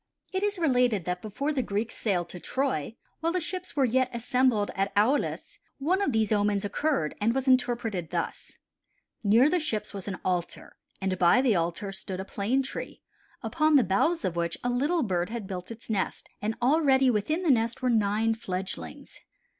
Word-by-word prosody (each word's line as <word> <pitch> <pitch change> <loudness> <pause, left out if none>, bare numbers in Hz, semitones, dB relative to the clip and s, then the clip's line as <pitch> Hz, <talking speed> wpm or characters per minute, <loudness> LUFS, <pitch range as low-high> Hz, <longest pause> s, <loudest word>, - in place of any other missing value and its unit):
It 375 - 0
is 410 -1 0
related 250 - +2
that 180 0 -2
before 275 +8 -2
the 270 - +1
Greeks 215 0 -2
sailed 180 -6 -1
to 180 - -7
Troy, 245 - -2 0.2
while 330 +1 0
the 365 - 0
ships 365 +2 -4
were 275 -2 +3
yet 255 +1 +2
assembled 240 -2 +1
at 195 +1 -1
Aulis, 250 +8 +1 0.2
one 355 +8 +1
of 395 - +1
these 220 -2 +1
omens 205 -1 +1
occurred 270 - 0
and 230 +4 +2
was 270 0 -1
interpreted 240 -8 +1
thus: - - -4 0.7
Near 225 +6 +5
the 355 +3 +2
ships 215 -10 -3
was 195 -1 -7
an 195 -2 -3
altar 180 -2 -2 0.2
and 190 -2 -2
by 175 +7 +5
the 250 -5 +3
altar 175 +4 -1
stood 190 -1 -5
a 190 - -4
plane 230 +8 0
tree, 265 - -7 0.4
upon 310 -1 +2
the 270 - +6
bough 200 - +2
of 175 - -1
which 170 0 -1
a 245 - 0
little 295 +7 +1
bird 180 -4 -1
had 230 -2 -5
built 185 -2 -6
its 230 0 -9
nest, 205 -4 -2
and 220 +1 -1
already 270 -2 +4
within 305 - 0
the 325 - +4
nest 230 0 0
were 250 - +2
nine 220 0 +2
fledglings. 185 - -6
225 Hz, 185 wpm, -28 LUFS, 195-270 Hz, 0.7 s, the